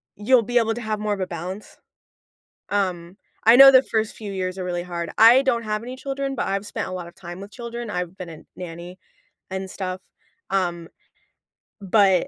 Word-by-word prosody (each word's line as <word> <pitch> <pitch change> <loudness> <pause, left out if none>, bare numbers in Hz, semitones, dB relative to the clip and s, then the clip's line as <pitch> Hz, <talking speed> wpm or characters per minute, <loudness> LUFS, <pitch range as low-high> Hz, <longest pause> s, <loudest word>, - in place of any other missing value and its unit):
you'll 230 +4 +3
be 245 +3 0
able 225 -1 +1
to 240 - -6
have 215 -1 -2
more 210 0 -1
of 200 - -4
a 185 - -2
balance. 180 +4 -7 0.9
Um, 185 -3 -2 0.3
I 230 +2 +8
know 270 0 +11
the 260 0 +7
first 220 -3 -1
few 210 -2 -7
years 185 -1 -3
are 185 - -4
really 175 -1 -3
hard. 170 -2 -5
I 235 +4 +8
don't 245 -4 0
have 215 0 -2
any 250 +2 -7
children, 275 0 -3
but - - -2
I've 195 +1 -2
spent - - -4
a - - -7
lot 180 -2 -5
of 170 - -14
time 175 0 -9
with 200 +1 -10
children, 235 -1 -6
I've 180 -2 -4
been 180 -2 -7
a 160 - -9 0.2
nanny 175 +1 -8 0.5
and 190 0 -4
stuff, 185 -1 -4 0.5
um, 175 -3 -1 0.9
but, 195 -2 +3
195 Hz, 200 wpm, -23 LUFS, 180-230 Hz, 0.9 s, know